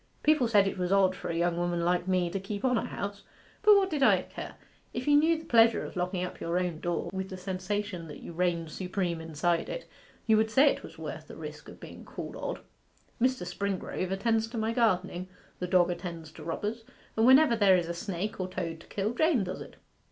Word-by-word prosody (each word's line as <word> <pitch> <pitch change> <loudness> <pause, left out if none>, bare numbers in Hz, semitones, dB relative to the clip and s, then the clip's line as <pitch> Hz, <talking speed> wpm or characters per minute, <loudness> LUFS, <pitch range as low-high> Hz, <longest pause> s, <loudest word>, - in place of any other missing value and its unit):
People 300 -5 +4
said 205 -3 +4
it 195 - -3
was 180 0 -1
odd 190 -1 +4
for - - -6
a 165 - -2
young 170 0 +1
woman 175 -1 0
like 180 +1 +1
me 180 -2 +1
to 195 - -2
keep 200 +4 -4
on 250 -1 +3
a 225 - 0
house; 200 0 -5 0.4
but 420 0 +7
what 395 -1 +4
did 295 -3 -1
I 270 - +5
care? - - -8 0.4
If - - -3
you 290 - +6
knew 320 +3 +4
the 320 - -10
pleasure 230 -1 +4
of - - -9
locking 180 0 -1
up 180 - -6
your 170 +1 -1
own 180 -3 -1
door, 175 0 -2
with 190 0 -3
the 185 - -6
sensation 185 -1 -3
that 150 - -9
you - - -8
reigned 170 -2 0
supreme 180 -1 -2
inside 165 +2 0
it, - - -5 0.4
you 220 -1 +5
would 220 0 +2
say 275 +6 +5
it - - -5
was - - -11
worth - - -7
the - - -10
risk - - -8
of - - -12
being - - -10
called - - -7
odd. - - -4 0.6
Mr. 255 -6 +2
Springrove 185 0 -3
attends 220 +3 +1
to 230 +1 -7
my 220 +1 0
gardening, 185 -6 +1 0.3
the 180 - -2
dog 180 -1 +4
attends 170 -3 -6
to 155 - -11
robbers, 210 +8 -3 0.3
and 225 +2 +4
whenever 265 -1 +7
there 200 -4 +5
is 175 -2 -1
a 170 - -2
snake 195 +4 -4
or 185 - -1
toad 170 -3 -4
to - - -16
kill, 205 +3 -2
Jane 310 -4 +3
does 185 0 -5
it. - - -10
190 Hz, 230 wpm, -29 LUFS, 175-225 Hz, 0.6 s, but